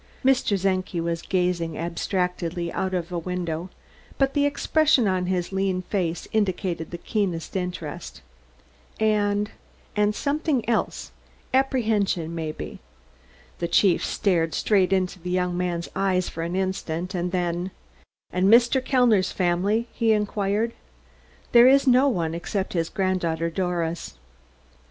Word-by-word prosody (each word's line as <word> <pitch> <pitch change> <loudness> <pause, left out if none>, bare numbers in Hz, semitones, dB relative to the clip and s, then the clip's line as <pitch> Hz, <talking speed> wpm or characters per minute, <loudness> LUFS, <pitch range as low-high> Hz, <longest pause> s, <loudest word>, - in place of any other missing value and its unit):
Mr. 255 -7 +3
Czenki 185 -2 0
was 165 0 -2
gazing 180 -3 -1
abstractedly 175 0 -2
out 190 0 -1
of 175 -1 -3
a 175 - -1
window, 175 0 -3 0.5
but 270 0 +2
the 285 0 +3
expression 285 -3 +3
on 185 -1 0
his 180 -1 -1
lean 190 -1 0
face 175 -4 -2
indicated 185 -5 -1
the 175 - -6
keenest 180 -3 -2
interest, 180 -4 -5 0.8
and 210 -1 +1 0.4
and 210 0 +2
something 285 -3 0
else; 230 -2 -1 0.4
apprehension, 220 - +1
maybe. 160 -2 -5 0.8
The 170 - -1
chief 175 +1 +3
stared 165 -5 +1
straight 195 -3 +2
into 185 -1 0
the 180 +1 -6
young 180 -1 0
man's 175 -1 -2
eyes 190 -2 +1
for 165 - -6
an 170 +2 -3
instant, 185 -2 -2
and 180 -1 -2
then: 175 0 -1 0.6
"And 180 +2 +2
Mr. 240 +3 +5
Kellner's 240 -8 +3
family?" 190 +6 +1
he 225 -1 +2
inquired. 210 +2 0 0.8
"There 240 +1 +8
is 275 +2 +5
no 260 +1 +5
one, 165 -8 -1
except 190 +3 -3
his 165 -2 0
granddaughter, 170 -4 -1
Doris." 170 -2 -2
185 Hz, 130 wpm, -25 LUFS, 175-210 Hz, 0.8 s, There